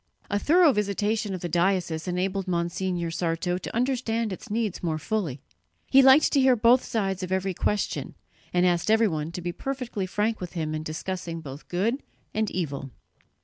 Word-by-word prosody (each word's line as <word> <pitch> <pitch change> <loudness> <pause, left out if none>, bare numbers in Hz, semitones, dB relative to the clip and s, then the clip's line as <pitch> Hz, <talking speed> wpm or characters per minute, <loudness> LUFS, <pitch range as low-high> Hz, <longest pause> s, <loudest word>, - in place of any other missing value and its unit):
A 205 - +2
thorough 325 - +5
visitation 210 0 0
of 180 - -7
the 175 - -2
diocese 175 -1 0
enabled 185 +2 -1
Monsignor 175 0 -1
Sarto 175 +1 -1
to 185 - -7
understand 235 -3 0
its 205 - -9
needs 215 -2 -1
more 160 -3 -1
fully. 155 - -2 0.5
He 270 - +8
liked 265 +3 +6
to 285 - +3
hear 260 -1 +5
both 240 +3 +5
sides 195 -4 -1
of 185 0 -4
every 190 0 0
question, 205 +3 -1 0.4
and 180 0 +3
asked 175 +2 +1
everyone 180 -9 +2
to 180 - -5
be 175 - -2
perfectly 250 -4 -4
frank 210 +3 -1
with 180 - -6
him 155 -3 -2
in 155 - -2
discussing 165 +2 -4
both 145 -2 -9
good 225 +10 0 0.3
and 215 -1 0
evil. 140 -6 -3
190 Hz, 175 wpm, -26 LUFS, 170-220 Hz, 0.5 s, He